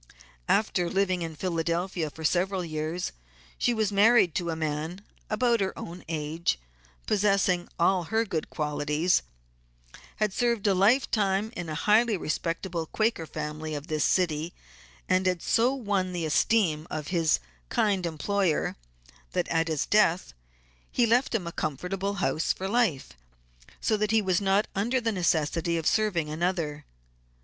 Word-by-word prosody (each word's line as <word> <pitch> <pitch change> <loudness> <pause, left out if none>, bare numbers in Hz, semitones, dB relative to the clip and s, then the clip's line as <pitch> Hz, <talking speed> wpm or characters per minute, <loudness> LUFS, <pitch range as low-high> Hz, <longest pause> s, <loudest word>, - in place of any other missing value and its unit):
After 180 -5 +2
living 185 -2 +1
in 165 -1 -4
Philadelphia 170 0 -1
for 160 +3 -11
several 185 +3 +1
years, 160 +2 -3 0.5
she 245 - +2
was 220 -3 0
married 205 -3 +5
to 170 +1 -2
a 165 - -1
man 155 +1 -2
of 185 - -12 0.3
about 235 +2 +2
her 195 -1 -2
own 175 +2 -8
age, 160 - -1 0.5
possessing 195 -3 +2
all 175 +1 +2
her 225 +5 +1
good 165 -6 -3
qualities; 150 +3 0 0.9
had 210 -2 0
served 235 -2 0
a 200 - +4
life 210 +8 +3
time 205 +1 +1
in 175 -4 -5
a 155 - -3
highly 215 +5 +3
respectable 165 +1 -3
Quaker 215 -6 0
family 155 0 -5
of 145 0 -5
this 155 -2 0
city, 165 -2 +1 0.5
and 185 0 +2
had 180 -2 0
so 235 +3 +3
won 200 -8 -1
the 170 -2 -2
esteem 160 -1 +2
of 150 -2 -4
his 165 -4 +2 0.3
kind 195 -5 +1
employer 175 +1 0 0.6
that - - 0
at 165 0 +1
his 155 -3 -1
death 185 - +2 0.6
he 245 - +3
left 240 +2 +2
him 195 -6 -1
a 170 - -4
comfortable 185 +8 -3
house 155 -2 0
for 190 - -3
life, 205 - +1 0.7
so 220 - +1
that 210 0 0
he 220 +1 +4
was 190 -2 +1
not 195 +1 +2
under 235 +7 +1
the 230 -2 0
necessity 170 -2 0
of 165 - -3
serving 195 -7 +1
another. 155 -2 -2
180 Hz, 155 wpm, -27 LUFS, 160-205 Hz, 0.9 s, married